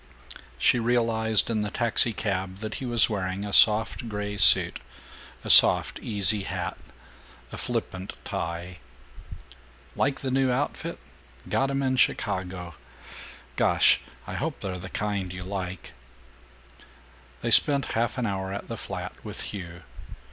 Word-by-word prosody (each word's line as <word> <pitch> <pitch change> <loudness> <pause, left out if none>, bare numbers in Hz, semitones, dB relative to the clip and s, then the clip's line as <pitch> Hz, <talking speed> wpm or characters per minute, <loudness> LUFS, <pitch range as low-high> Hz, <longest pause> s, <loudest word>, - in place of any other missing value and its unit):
She 125 - +2
realized, 115 -2 +1
in 110 -2 -1
the 105 - -3
taxicab, 100 -5 -1
that 110 0 -5
he 130 - -4
was 120 -2 +4
wearing 95 -2 -4
a 100 - -6
soft 110 +3 +4
gray 105 -1 -5
suit, 100 - +5 0.6
a - - -7
soft - - +7
easy 105 -1 +4
hat, - - -5 0.8
a - - -8
flippant 95 +1 -5
tie. 85 +1 -6 1.2
"Like 140 -1 -1
the 130 - -3
new 130 0 +1
outfit? 135 +4 -3 0.5
Got 135 - 0
'em 140 0 -2
in 130 -1 0
Chicago. 90 -6 -2 0.8
Gosh, - - +3 0.2
I - - -8
hope - - -4
they're 95 -1 -5
the 95 +1 -9
kind 100 -3 -3
you 90 0 -7
like." 95 -1 -7 1.5
They - - -2
spent 140 -2 +5
half 115 +3 -1
an 125 - -2
hour 95 -2 -4
at 100 - -7
the - - -5
flat, - - -7
with - - -8
Hugh. 90 -3 -9
105 Hz, 135 wpm, -25 LUFS, 95-120 Hz, 1.5 s, soft